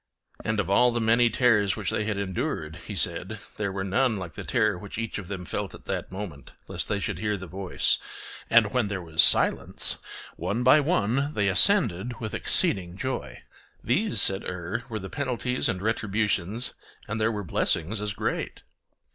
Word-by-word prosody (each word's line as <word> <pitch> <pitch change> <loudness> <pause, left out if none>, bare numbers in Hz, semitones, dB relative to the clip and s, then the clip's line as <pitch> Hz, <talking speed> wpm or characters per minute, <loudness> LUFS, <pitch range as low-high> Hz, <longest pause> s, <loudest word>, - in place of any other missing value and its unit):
And 110 -1 -1
of 100 - -1
all 125 +6 +4
the 120 - -2
many 115 +1 +3
terrors 115 -6 +2
which 105 -5 -3
they 105 - -2
had 105 -2 -2
endured, 100 - -4
he - - -6
said - - +3
that - - -9
there 100 -2 -2
was 95 0 -4
none 110 +4 +1
like 90 -5 -7
the - - -8
terror 110 -5 +1
which 100 +3 -9
each 115 -1 -4
of 95 - -9
them 95 -2 -6
felt - - -4
at - - -16
that - - -4
moment, 95 -7 -8
lest - - -4
they 105 - 0
should 100 -2 -4
hear 105 0 -1
the 95 - -8
voice; 95 +2 -1 0.5
and 115 -3 +4
when 125 -4 +1
there 100 -1 -4
was 80 -1 +2
silence, - - +6 0.4
one 100 +8 -2
by 130 +4 +6
one 140 - 0
they 100 -2 +1
ascended 120 - +2
with 110 -4 -6
exceeding 90 -2 +2
joy. 130 +4 -5 0.4
These, 195 - +1
said 95 0 +4
Er, 90 +7 -5
were 110 - -4
the 95 -2 -7
penalties 125 -1 -2
and 90 0 -3
retributions, 105 0 -1 0.3
and 110 +1 -3
there 110 +1 +2
were 105 -2 -4
blessings 90 +3 0
as 105 -1 -3
great. - - -4
105 Hz, 190 wpm, -26 LUFS, 95-120 Hz, 0.5 s, silence